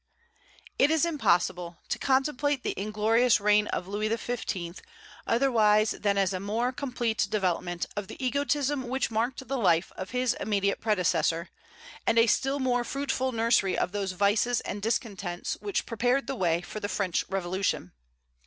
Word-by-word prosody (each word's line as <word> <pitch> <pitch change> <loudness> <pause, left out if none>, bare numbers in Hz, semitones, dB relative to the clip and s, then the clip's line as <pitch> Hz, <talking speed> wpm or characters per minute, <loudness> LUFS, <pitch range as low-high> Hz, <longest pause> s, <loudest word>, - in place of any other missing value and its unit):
It 280 - +5
is 320 0 +3
impossible 180 - 0
to - - -1
contemplate 275 0 +1
the - - 0
inglorious 215 +4 +2
reign 210 +1 +3
of 180 - -3
Louis 210 +2 -2
XV. 220 -7 -3 0.5
otherwise 220 -4 +3
than 200 -1 0
as 195 -1 +2
a 185 - -2
more 220 +6 -1
complete 250 -4 -1
development 180 -3 -1
of 205 -2 -4
the - - -9
egotism 280 0 0
which 260 -1 -1
marked 240 +4 -2
the 270 0 -2
life 170 -5 +2
of 185 - -6
his 250 -1 +1
immediate 200 -2 0
predecessor, 170 -5 +1 0.6
and 230 - +3
a 230 - +7
still 270 +4 +1
more 250 -3 +1
fruitful 260 0 -2
nursery 230 -4 +2
of - - 0
those 195 -2 -2
vices 205 +5 +2
and 205 - -5
discontents 200 -5 -2
which 405 -2 -2
prepared 245 +4 +1
the - - -3
way 175 -7 +1
for 215 - -7
the 205 - -4
French 185 -3 0
Revolution. 185 - -1
215 Hz, 155 wpm, -28 LUFS, 195-255 Hz, 0.6 s, a